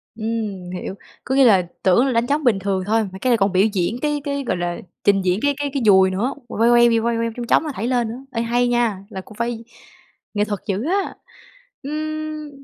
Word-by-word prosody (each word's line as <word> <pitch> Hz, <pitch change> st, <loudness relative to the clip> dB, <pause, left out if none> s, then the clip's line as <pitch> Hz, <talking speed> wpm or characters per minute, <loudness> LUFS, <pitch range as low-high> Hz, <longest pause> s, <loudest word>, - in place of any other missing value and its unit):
Ừm, 215 Hz, -5 st, -4 dB
hiểu. 185 Hz, +1 st, -5 dB, 0.3 s
Có 265 Hz, -, -1 dB
nghĩa 275 Hz, -, +6 dB
là 190 Hz, -6 st, +4 dB, 0.2 s
tưởng 195 Hz, +8 st, +4 dB
là 265 Hz, -, +1 dB
đánh 235 Hz, +1 st, +1 dB
trống 290 Hz, +1 st, 0 dB
bình 220 Hz, -6 st, +3 dB
thường 190 Hz, -1 st, -1 dB
thôi, 220 Hz, +1 st, +2 dB
mà 190 Hz, -1 st, -8 dB
cái 255 Hz, -, +1 dB
này 235 Hz, -, +4 dB
còn 195 Hz, -1 st, +2 dB
biểu 190 Hz, +2 st, +4 dB
diễn 195 Hz, +6 st, -1 dB
cái 295 Hz, -1 st, -1 dB
cái, 280 Hz, -1 st, -2 dB
gọi 185 Hz, -, -1 dB
là, 175 Hz, 0 st, -2 dB, 0.3 s
trình 200 Hz, -1 st, +4 dB
diễn 180 Hz, +3 st, +2 dB
cái 285 Hz, 0 st, +2 dB
cái 290 Hz, -1 st, -2 dB
cái 270 Hz, -4 st, -1 dB
dùi 190 Hz, -2 st, +6 dB
nữa, 230 Hz, +9 st, -1 dB
quay 230 Hz, 0 st, +2 dB
quay 240 Hz, 0 st, +6 dB
quay 230 Hz, 0 st, 0 dB
quay 230 Hz, 0 st, 0 dB
chong 240 Hz, -1 st, -4 dB
chóng -, -, +4 dB
mà 305 Hz, -, -3 dB
thảy 230 Hz, +1 st, -3 dB
lên 245 Hz, -3 st, +1 dB
nữa, 255 Hz, +4 st, -8 dB
ê, 230 Hz, -, -2 dB
hay 240 Hz, +1 st, +1 dB
nha, 240 Hz, -5 st, +1 dB
là 190 Hz, -, -6 dB
cũng 210 Hz, -, -15 dB
phải 235 Hz, -1 st, -3 dB, 0.7 s
nghệ 205 Hz, 0 st, +1 dB
thuật 205 Hz, -2 st, -3 dB
dữ 200 Hz, +3 st, -1 dB
á. 390 Hz, +3 st, -1 dB, 0.7 s
Ừm, 310 Hz, +1 st, -4 dB
230 Hz, 240 wpm, -21 LUFS, 195-265 Hz, 0.7 s, nghĩa